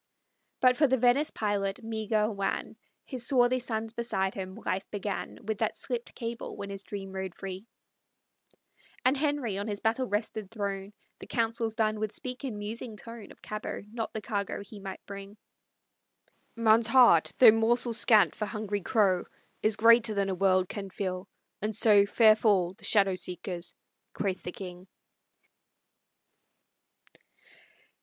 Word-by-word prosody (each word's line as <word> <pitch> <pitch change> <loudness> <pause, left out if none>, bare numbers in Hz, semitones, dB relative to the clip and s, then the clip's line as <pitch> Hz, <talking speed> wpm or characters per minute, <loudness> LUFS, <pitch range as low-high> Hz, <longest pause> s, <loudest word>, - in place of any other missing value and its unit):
But 255 -1 +5
for 295 - +5
the 260 0 +2
Venice 250 +5 +3
pilot, 205 +1 -2
meagre, 220 -1 0
wan, 200 -2 -3 0.3
His 255 -4 -4
swarthy 255 -1 +4
sons 225 -2 -3
beside 205 -5 -1
him, 190 -1 -6
life 190 +2 -2
began 205 -1 -4
With 215 -1 -2
that 220 - 0
slipt 240 -2 -5
cable, 230 0 -5
when 200 0 -6
his 195 0 -5
dream 195 -1 -7
rode 190 -2 -5
free. 195 +2 -7 1.4
And 260 +2 +4
Henry, 280 -8 -1
on 205 - -4
his 205 -2 -3
battle 230 +4 0
wrested 210 -1 -3
throne, 200 -2 -4 0.3
The - - -10
Councils 225 -1 -1
done, 215 -2 0
would 215 -1 -2
speak 255 +3 -5
in 245 -6 -4
musing 215 +2 -6
tone 230 -1 -10
Of - - -18
Cabot, 215 -1 -5
not 225 -2 -3
the 220 - -5
cargo 200 -2 -3
he 205 +1 -11
might 195 -1 -8
bring. 200 +1 -9 1.2
"Man's 230 0 +4
heart, 245 +1 +6
though 240 -4 +9
morsel 230 +2 +2
scant 215 - +5
for 210 - -4
hungry 210 -2 -3
crow, 190 -2 +2 0.4
Is 215 -1 +3
greater 230 0 +5
than 200 -1 0
a - - 0
world 185 0 +2
can 195 0 -6
fill, 185 0 -4 0.3
and 215 0 -1
so 205 -2 +5
Fair 215 +1 +6
fall 195 -5 +2
the - - -11
shadow 195 -2 +3
seekers!" 180 0 -4 0.4
quoth 190 -3 -2
the 180 - -5
king. 180 0 -9
215 Hz, 150 wpm, -29 LUFS, 195-230 Hz, 1.4 s, though